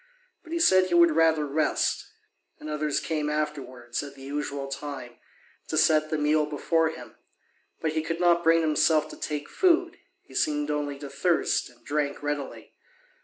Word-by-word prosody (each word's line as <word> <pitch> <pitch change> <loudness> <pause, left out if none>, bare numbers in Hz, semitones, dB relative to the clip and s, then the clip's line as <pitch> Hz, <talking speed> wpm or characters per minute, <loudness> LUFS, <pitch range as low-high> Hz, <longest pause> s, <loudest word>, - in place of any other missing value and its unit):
But 325 - -15
he 335 - -1
said 185 - +5
he 175 - 0
would 170 -1 +6
rather 160 -2 +3
rest. 150 +2 0 0.5
And 155 - -7
others 150 -1 0
came 155 -2 -2
afterwards, 135 -6 -3
at 140 -1 -9
the 135 - -13
usual 140 0 -4
time, 135 -3 -7 0.5
to 155 - -2
set 155 0 +4
the 155 - -1
meal 150 0 +2
before 160 +2 +1
him; 160 - -10 0.7
but 160 - 0
he 160 0 -1
could 165 +1 -4
not 170 -1 +3
bring 165 0 +4
himself 155 0 +2
to - - -9
take 150 -1 -4
food: 355 -3 +2 0.3
he - - -18
seemed 150 0 0
only 145 -1 -2
to 140 0 -8
thirst, 165 +2 +1
and 120 -1 -23
drank 145 -1 -2
readily. 145 -1 -4
150 Hz, 170 wpm, -26 LUFS, 145-160 Hz, 0.7 s, would